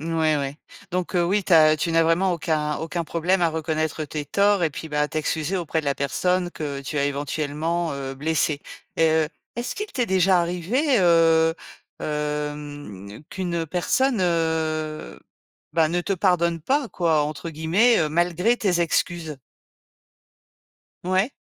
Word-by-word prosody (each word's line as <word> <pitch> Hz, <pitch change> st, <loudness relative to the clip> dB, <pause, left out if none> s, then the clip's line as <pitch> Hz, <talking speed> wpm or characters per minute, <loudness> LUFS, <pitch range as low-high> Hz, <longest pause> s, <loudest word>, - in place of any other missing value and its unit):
Mouais 160 Hz, -1 st, +1 dB
ouais, 140 Hz, 0 st, -3 dB, 0.3 s
donc 180 Hz, 0 st, -3 dB
heu, 175 Hz, -, +3 dB
oui 195 Hz, +3 st, +1 dB
tu -, -, -1 dB
as 155 Hz, -1 st, +7 dB
tu 165 Hz, +2 st, -1 dB
n'as 165 Hz, -, +4 dB
vraiment 170 Hz, +3 st, +2 dB
aucun 155 Hz, -3 st, -1 dB
aucun 165 Hz, +1 st, -3 dB
problème 175 Hz, +3 st, 0 dB
à 170 Hz, -, +4 dB
reconnaître 160 Hz, -1 st, -2 dB
tes 150 Hz, 0 st, -5 dB
torts 200 Hz, +2 st, +3 dB
et 160 Hz, -, +1 dB
puis, 160 Hz, -, -7 dB
bah, 150 Hz, 0 st, +1 dB
t'excuser 155 Hz, +4 st, -2 dB
auprès 165 Hz, -2 st, -2 dB
de -, -, -12 dB
la 140 Hz, -1 st, +1 dB
personne 180 Hz, +6 st, 0 dB
que, 145 Hz, -4 st, -5 dB
tu 150 Hz, +2 st, -4 dB
as 140 Hz, -, +2 dB
éventuellement, 150 Hz, +3 st, -2 dB
heu, 135 Hz, -1 st, -5 dB
blessée. 150 Hz, 0 st, 0 dB, 0.4 s
Et 165 Hz, -, +4 dB
heu, 160 Hz, -1 st, +2 dB, 0.3 s
est-ce 240 Hz, +1 st, -4 dB
qu'il 420 Hz, -, -3 dB
t'est 260 Hz, -, -1 dB
déjà 185 Hz, -1 st, +3 dB
arrivé, 200 Hz, -, +1 dB
heu, 165 Hz, -2 st, +4 dB, 0.5 s
hem, 150 Hz, -8 st, -5 dB
qu'une 170 Hz, -3 st, -2 dB
personne 230 Hz, -, +1 dB
heu, 160 Hz, -3 st, -1 dB, 0.5 s
bah, 160 Hz, -1 st, +3 dB
ne 175 Hz, +2 st, 0 dB
te 195 Hz, -, -2 dB
«pardonne 170 Hz, -3 st, +1 dB
pas» 270 Hz, -, 0 dB
quoi 165 Hz, -4 st, +1 dB
entre 155 Hz, +3 st, -4 dB
guillemets 170 Hz, +10 st, +3 dB
heu, 155 Hz, -, +1 dB
malgré 175 Hz, +8 st, +1 dB
tes 185 Hz, -6 st, +1 dB
excuses? 165 Hz, -2 st, -1 dB, 1.7 s
Ouais. 185 Hz, +6 st, +1 dB
165 Hz, 155 wpm, -23 LUFS, 150-180 Hz, 1.7 s, as